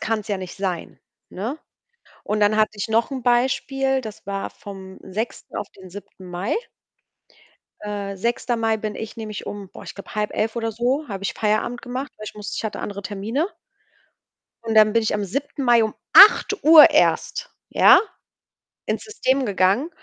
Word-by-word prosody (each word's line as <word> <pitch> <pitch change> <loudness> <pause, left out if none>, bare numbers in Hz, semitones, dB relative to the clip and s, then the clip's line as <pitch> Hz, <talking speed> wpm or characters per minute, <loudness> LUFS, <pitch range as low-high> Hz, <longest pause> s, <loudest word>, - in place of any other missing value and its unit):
kann's 215 -2 -2
ja 205 - 0
nicht 185 -1 -8
sein, 185 -3 -4 0.3
ne? 235 +11 -5 0.7
Und 210 0 -1
dann 205 +1 +3
hatte 215 0 +3
ich 205 +1 -4
noch 225 +3 +1
'n 260 -3 -5
Beispiel, 265 +2 +1
das 220 -3 -10
war 195 0 -4
vom 190 -1 -11
6. 220 +5 -6
auf 205 - -4
den 190 -2 -14
7. 195 0 -12
Mai. 180 +5 -2 1.3
Äh, 200 -2 -5
6. 235 +3 -1
Mai 225 -1 +1
bin 215 -1 -5
ich 220 +1 -7
nämlich 215 -2 -7
um, 200 -2 -7
boah, - - -11
ich - - -9
glaube, 200 - -11
10:30 215 +1 -1
oder 225 -1 -2
so, 250 +7 -1
habe 195 -3 -6
ich - - -2
Feierabend 215 +3 -1
gemacht, 260 +2 -5
weil 215 - -9
ich - - -8
musste 210 -1 -6
ich - - -3
hatte 215 - -4
andere 200 -1 -5
Termine. 215 - -2 1.1
Und 225 -1 -2
dann 215 -1 +6
bin 230 - +3
ich 215 - 0
am 210 - -1
7. 275 +7 -4
Mai 240 -2 +5
um 220 - -2 0.2
8:00 380 -6 +8
erst, - - +1 0.2
ja, - - +7 0.9
ins - - -2
System 275 -11 0
gegangen. 200 - +1
215 Hz, 175 wpm, -22 LUFS, 200-245 Hz, 1.3 s, 8:00